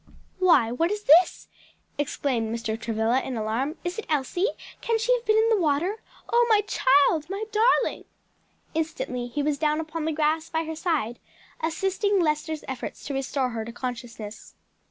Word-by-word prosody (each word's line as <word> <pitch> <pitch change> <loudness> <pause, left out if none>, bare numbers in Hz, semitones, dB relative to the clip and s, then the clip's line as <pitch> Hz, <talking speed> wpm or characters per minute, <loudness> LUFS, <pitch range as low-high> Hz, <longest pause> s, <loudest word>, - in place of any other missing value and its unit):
"Why, 315 -11 +5
what 330 +8 +1
is 420 +1 -3
this?" 340 +3 +5 0.5
exclaimed 260 -6 -1
Mr. 230 -1 -2
Travilla 225 +2 0
in 255 -3 -4
alarm, 230 +8 -2
"is 350 +5 -3
it - - -7
Elsie? 310 - +1 0.3
can 460 -1 +1
she 465 +3 +2
have 485 -1 -2
been 430 0 +4
in 445 +1 +4
the 435 -4 +3
water? 340 +8 0 0.3
Oh, 475 0 +5
my 430 -2 +5
child, 295 -4 +3
my 395 +2 -3
darling!" 455 +3 +2 0.7
Instantly 310 -6 -2
he 285 +4 -2
was 290 -1 0
down 305 0 +1
upon 320 0 -4
the 320 - 0
grass 310 +1 0
by 320 0 -1
her 320 0 -5
side, 310 -9 -1 0.4
assisting 385 +5 0
Lester's 310 -1 -1
efforts 260 -2 -6
to 285 - -4
restore 270 -1 -1
her 225 -2 -4
to 230 - -7
consciousness. 235 -3 -7
305 Hz, 170 wpm, -26 LUFS, 250-365 Hz, 0.7 s, Why